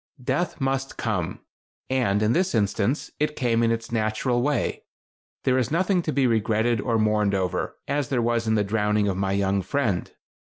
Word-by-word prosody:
Death 145 +8 -1
must 135 0 -1
come, 105 -8 -2 0.5
and, 110 -6 +1
in 110 +2 +3
this 185 -4 +1
instance, 110 +4 0
it 150 0 0
came 115 -2 +1
in 115 - +3
its 115 0 -2
natural 115 +2 0
way. 140 -2 0 0.6
There 130 0 +3
is 125 -2 0
nothing 180 +3 +2
to 160 - -2
be 140 -2 +2
regretted 110 0 +1
or 115 -2 0
mourned 105 -2 +2
over, 95 -2 -1
as 140 -2 -1
there 130 - +1
was 115 -1 0
in 110 - +2
the 105 - +2
drowning 105 0 +1
of 95 - 0
my 95 0 -1
young 100 0 +1
friend. 100 -2 -1
115 Hz, 185 wpm, -25 LUFS, 105-130 Hz, 0.6 s, in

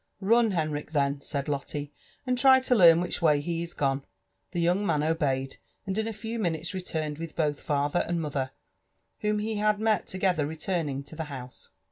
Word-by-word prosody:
•*Run, 225 +1 +4
Henrich, 155 -2 -2
then," 140 -1 +1
said 140 -1 -3
Lotte, 145 0 -3 0.3
and 255 -1 +1
try 260 +1 +7
to 260 -1 +1
learn 170 -6 +7
which 180 0 -2
way 150 -3 +4
he 165 +3 -2
is 170 0 -5
gone." 135 -1 0 0.5
The 175 - -3
young 175 +4 +2
man 150 -7 +1
obeyed, 140 -5 0 0.3
and 190 -1 -2
in 220 +1 -1
a - - -2
few 225 +2 -5
minutes 170 -2 -1
returned 160 -5 -3
with 165 -1 -6
both 150 -3 0
father 145 +3 0
and 175 0 -1
mother, 140 -4 -2 0.7
whom 210 0 0
he 215 +1 -2
had 210 0 +2
met 215 -3 +1
together 185 -5 0
returning 155 -3 -2
to 145 +3 -11
the 160 0 -4
house. 130 -4 -8
165 Hz, 190 wpm, -28 LUFS, 145-200 Hz, 0.7 s, try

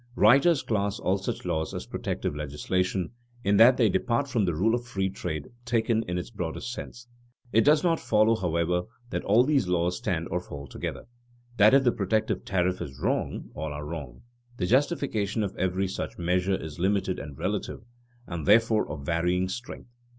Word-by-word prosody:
_ - - -30
Writers 135 +9 +5
class 100 -2 -1
all 95 +2 0
such 95 - -4
laws 80 -2 -2
as - - -5
protective - - -3
legislation, 90 +6 -2 0.3
in 100 0 +3
that 125 +4 +7
they 115 - +4
depart 115 +8 0
from 115 -6 +1
the 85 -3 0
rule 105 +8 +2
of 120 0 0
free 95 -5 -2
trade 80 -6 -5
taken 115 -1 +1
in 90 0 -2
its 90 - -5
broadest 100 +4 -4
sense. 120 -1 -9 0.5
It 115 - +6
does 150 +3 +4
not 170 -2 +2
follow, 110 +1 +3
however, 90 -2 0 0.3
that - - -2
all 110 +5 +5
these 140 -7 +2
laws 90 0 +1
stand 85 -2 -2
or 90 - 0
fall 70 -5 -8
together, - - -6 0.5
that 105 +5 +7
if 135 - +5
the 120 - +4
protective 110 +1 -1
tariff 90 -1 0
is 65 -1 -7
wrong, - - -2
all 80 0 -4
are 75 +1 -6
wrong. 75 -6 -7 0.3
The 90 - -1
justification 120 - +1
of 100 - -4
every 95 +1 0
such 95 - -5
measure 90 +2 +1
is 80 -3 -7
limited 95 0 0
and 70 -2 -8
relative, 95 +5 -3 0.4
and 85 -5 -5
therefore 110 -1 +4
of 70 -2 -6
varying 90 +3 +1
strength. 120 +2 -7
95 Hz, 185 wpm, -27 LUFS, 85-115 Hz, 0.5 s, that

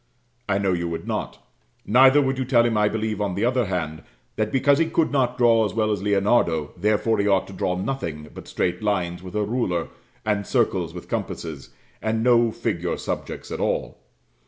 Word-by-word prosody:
I 95 - +2
know 100 -2 +1
you 85 -1 -1
would 85 - -5
not; - - -4 0.4
neither 130 +5 +6
would 135 0 -1
you - - +1
tell 120 -2 +3
him, 115 -2 +1
I 105 0 +3
believe, 110 -1 -2
on 100 -3 -1
the 100 - 0
other 125 -1 +1
hand, 80 -5 -3 0.3
that 110 0 -1
because 140 +2 +3
he 165 - +2
could 165 0 +1
not 125 -3 +1
draw 115 -2 +4
as 105 - -2
well 110 -1 +1
as 105 -3 -1
Leonardo, 100 -6 +1
therefore 105 +4 +1
he 100 - +1
ought 95 -2 +3
to 95 - -11
draw 90 -1 -1
nothing 90 - -4
but - - -10
straight 90 0 -1
lines 90 -5 -1
with 95 +2 -9
a 105 - +1
ruler, 105 -6 -1 0.4
and 105 -2 0
circles 95 -9 +1
with 90 0 -9
compasses, 75 -5 -5 0.3
and 110 +1 -1
no 120 -1 +4
figure - - -2
subjects - - -5
at - - -4
all. - - -2
105 Hz, 200 wpm, -23 LUFS, 90-120 Hz, 0.4 s, neither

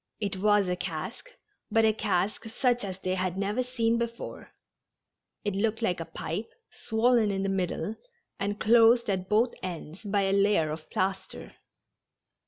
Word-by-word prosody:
It 200 -3 -1
was 205 0 +3
a 180 - 0
cask, 180 - -5 0.4
but 225 -1 +4
a 220 - +4
cask 195 0 -1
such 245 +1 0
as 190 -2 -4
they 185 -1 -2
had 185 -1 -1
never 205 +5 0
seen 235 -2 0
before, 235 0 -5 1.0
It 205 - 0
looked 225 +3 0
like 180 -5 +1
a 165 - -4
pipe, 170 +5 -5 0.2
swollen 230 -1 +2
in 195 -1 -1
the 195 - 0
middle, 190 +1 -1 0.4
and 205 +1 -2
closed 230 0 +5
at 185 -1 -2
both 225 +3 +3
ends 170 -1 -6
by 200 -1 +1
a 195 0 +1
layer 200 -6 +3
of 155 0 -7
plaster. 190 0 -3
205 Hz, 160 wpm, -28 LUFS, 185-225 Hz, 1.0 s, closed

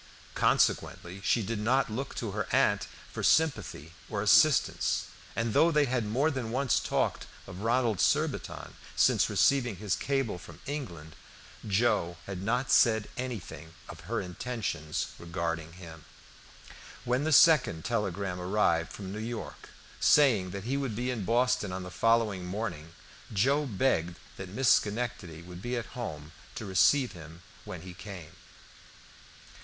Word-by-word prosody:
Consequently 90 +3 +1
she 115 +1 +2
did 110 +2 -3
not 125 +6 +2
look 130 +6 -4
to 115 -4 -3
her 105 0 -3
aunt - - +2 0.2
for - - -5
sympathy 140 - +1 0.2
or - - -2
assistance, - - +4 0.3
and 115 -1 -1
though 165 - +5
they 150 -3 +3
had 120 -4 -1
more 135 +9 +1
than 130 -5 -4
once 130 +2 +1
talked - - -1 0.2
of 95 -1 -9
Ronald 115 -2 +1
Surbiton - - 0 0.2
since - - +3
receiving 125 -6 +2
his 100 0 -1
cable 135 -9 -1
from - - -13
England, 90 - -6 0.5
Joe 95 -5 +1
had 95 -2 -6
not 120 +5 0
said 110 -2 +4
anything 100 - -6
of - - -10
her - - 0
intentions 95 -5 -3
regarding 85 -1 -4
him. 85 -3 -11 1.0
When 125 +3 +1
the 155 - 0
second 135 - +5
telegram 100 -5 -2
arrived 90 -3 +1
from 95 0 -7
New 105 - -5
York, 115 0 -6 0.3
saying 120 -11 +4
that 100 +1 -6
he 130 +5 -1
would 135 -6 -3
be 125 +3 -1
in 110 -6 -4
Boston 120 -3 +1
on 95 0 -4
the 90 - -8
following 115 -3 +2
morning, 90 -4 -5 0.4
Joe 140 +9 +2
begged 95 -7 0 0.2
that 95 -1 -7
Miss 125 +6 +1
Schenectady 105 -7 -2
would 90 0 -10
be 120 +3 -2
at 120 0 -6
home 75 -11 -6 0.2
to 110 - -5
receive 125 +7 +3
him 80 -1 -12 0.2
when 85 -2 -7
he 90 -1 -9
came. 95 -4 -9
105 Hz, 150 wpm, -29 LUFS, 90-125 Hz, 1.0 s, though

